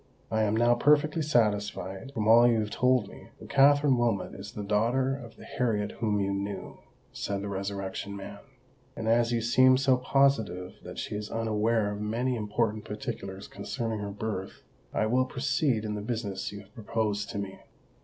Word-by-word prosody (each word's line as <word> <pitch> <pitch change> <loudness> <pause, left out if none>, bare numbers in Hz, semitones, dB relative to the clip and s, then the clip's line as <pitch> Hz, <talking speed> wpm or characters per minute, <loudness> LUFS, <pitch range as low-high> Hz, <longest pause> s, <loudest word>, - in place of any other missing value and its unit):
"I 110 0 +1
am 110 0 +2
now 120 +1 +5
perfectly 150 +5 +3
satisfied, 105 -5 0
from 110 -1 -1
all 120 +2 +7
you 115 -2 +3
have 105 0 -4
told 125 -4 +2
me, - - -13
that - - -11
Katherine 140 -1 +5
Wilmot 115 -5 0
is 100 +2 -9
the 105 - -5
daughter 120 +6 +1
of 120 -4 -10
the - - -13
Harriet 105 -4 -1
whom 105 -3 +1
you 100 0 0
knew," 100 +1 -5 0.3
said 100 -1 -3
the - - -3
Resurrection 100 0 -4
Man; 100 +1 -8 0.6
"and 110 - -4
as 115 +1 +3
you 120 -1 +1
seem 130 +3 +5
so 135 -1 +3
positive 115 -10 +1
that - - -9
she - - -4
is 105 0 -4
unaware 110 -1 +1
of 105 0 -5
many 120 +4 -1
important 110 0 -1
particulars 95 -2 -6
concerning 115 +2 -4
her 100 0 -4
birth, 100 -2 -5 0.3
I - - +1
will 125 +4 +2
proceed 130 -3 0
in 105 - -2
the 105 - -4
business 105 -4 -3
you 100 0 -8
have 100 +1 -20
proposed 105 -2 -2
to - - -5
me." 100 -1 -5
110 Hz, 185 wpm, -28 LUFS, 100-120 Hz, 0.6 s, all